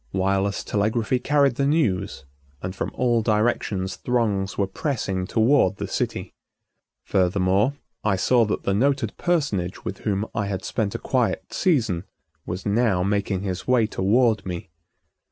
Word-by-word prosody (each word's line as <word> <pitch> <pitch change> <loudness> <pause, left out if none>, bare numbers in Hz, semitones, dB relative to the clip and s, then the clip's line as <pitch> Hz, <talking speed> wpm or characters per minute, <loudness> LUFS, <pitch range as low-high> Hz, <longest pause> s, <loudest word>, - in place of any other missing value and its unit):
Wireless 95 +1 0
telegraphy 110 +4 0
carried 140 -1 +2
the 140 - +2
news, 115 - 0 0.4
and 95 +1 -4
from - - -2
all 120 -2 +2
directions 105 -4 0
throngs 105 -6 0
were 100 - +2
pressing 95 - -2
toward 115 +1 +3
the - - -4
city. - - -3 0.7
Furthermore 95 +6 +2 0.3
I 105 -2 +2
saw 120 +6 +3
that 105 - -2
the 100 - +1
noted 130 0 +1
personage 140 - -1
with - - -4
whom 100 0 -1
I 100 -2 -1
had 95 -2 -4
spent 105 -4 -2
a - - +1
quiet - - -1
season 110 - +1 0.4
was 90 +1 -4
now 105 -3 +2
making 100 -1 0
his 95 -2 -4
way 125 -3 +4
toward 110 +2 +2
me. 85 -3 -6
105 Hz, 145 wpm, -24 LUFS, 95-120 Hz, 0.7 s, way